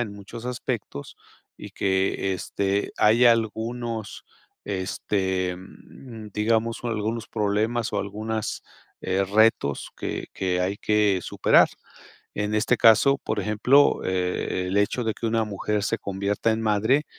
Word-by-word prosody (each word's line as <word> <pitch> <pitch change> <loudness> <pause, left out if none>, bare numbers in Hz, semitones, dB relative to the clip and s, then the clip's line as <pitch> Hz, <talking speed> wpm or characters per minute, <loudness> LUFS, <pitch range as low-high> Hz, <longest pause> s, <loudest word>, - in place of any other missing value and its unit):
en 110 -4 -3
muchos 100 +3 -10
aspectos 120 - -5 0.4
y - - -10
que, 95 0 0
este, 100 +2 -2
hay 115 +4 +4
algunos, 115 0 0 0.4
este, 95 -1 -2 0.8
digamos, 115 +2 0
algunos 115 0 -2
problemas 110 +2 -1
o - - 0
algunas, 110 +2 -4 0.4
eh, 95 +1 0
retos 105 -8 +2
que - - -4
que 90 -1 -1
hay 95 +2 -1
que 105 -3 +2
superar. - - +4 0.7
En 105 +1 -2
este 105 +1 +2
caso, 125 +5 +5
por 110 -1 -3
ejemplo, 110 +8 +3
eh, 90 0 -1
el 95 - -2
hecho 105 +4 +1
de 110 -1 -1
que 115 - -4
una 115 0 +1
mujer 105 0 -2
se 115 +2 -1
convierta 100 +3 -1
en 110 - -2
madre 110 +7 +2
105 Hz, 130 wpm, -24 LUFS, 100-115 Hz, 0.8 s, caso